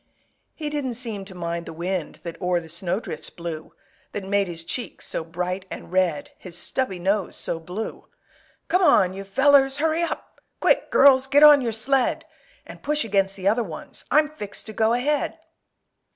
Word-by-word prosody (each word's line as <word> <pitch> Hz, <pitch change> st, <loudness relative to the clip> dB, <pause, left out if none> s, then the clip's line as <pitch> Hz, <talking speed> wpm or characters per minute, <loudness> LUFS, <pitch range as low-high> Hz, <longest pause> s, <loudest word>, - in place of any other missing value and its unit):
He 300 Hz, -2 st, -4 dB
didn't 270 Hz, -5 st, -2 dB
seem 225 Hz, -5 st, -5 dB
to 190 Hz, -1 st, -11 dB
mind 170 Hz, -1 st, -4 dB
the -, -, -7 dB
wind 175 Hz, 0 st, -4 dB
That 170 Hz, +1 st, -7 dB
o'er 180 Hz, -1 st, +1 dB
the 165 Hz, -1 st, -12 dB
snowdrifts 180 Hz, +5 st, -3 dB
blew, 165 Hz, -2 st, -7 dB, 0.4 s
That 205 Hz, -, -4 dB
made 200 Hz, 0 st, +1 dB
his 165 Hz, -2 st, -5 dB
cheeks 245 Hz, +8 st, -4 dB
so -, -, -2 dB
bright 180 Hz, +3 st, -4 dB
and -, -, -8 dB
red, 180 Hz, -5 st, 0 dB
His 180 Hz, -2 st, -7 dB
stubby 195 Hz, +1 st, -1 dB
nose 195 Hz, +2 st, 0 dB
so 165 Hz, -, -2 dB
blue! 180 Hz, +7 st, -6 dB, 0.6 s
"Come 365 Hz, -, +2 dB
on, 195 Hz, -, +5 dB
you 195 Hz, +1 st, -6 dB
fellers; 270 Hz, +6 st, +4 dB
hurry 320 Hz, +2 st, +1 dB
up! 340 Hz, -, -4 dB, 0.2 s
Quick, -, -, +2 dB
girls, 265 Hz, -1 st, +6 dB
get 285 Hz, +2 st, +5 dB
on 295 Hz, -2 st, +9 dB
your 235 Hz, -2 st, -1 dB
sled! 250 Hz, +4 st, +1 dB, 0.4 s
And -, -, -11 dB
push 300 Hz, -2 st, +1 dB
against 195 Hz, -2 st, +1 dB
the 190 Hz, 0 st, -3 dB
other 225 Hz, +4 st, +3 dB
ones, 170 Hz, -7 st, -8 dB
I'm 305 Hz, +1 st, +4 dB
fixed 210 Hz, -10 st, -6 dB
to 220 Hz, -, -7 dB
go 220 Hz, +1 st, +2 dB
ahead!" 285 Hz, +5 st, 0 dB
200 Hz, 180 wpm, -24 LUFS, 180-270 Hz, 0.6 s, on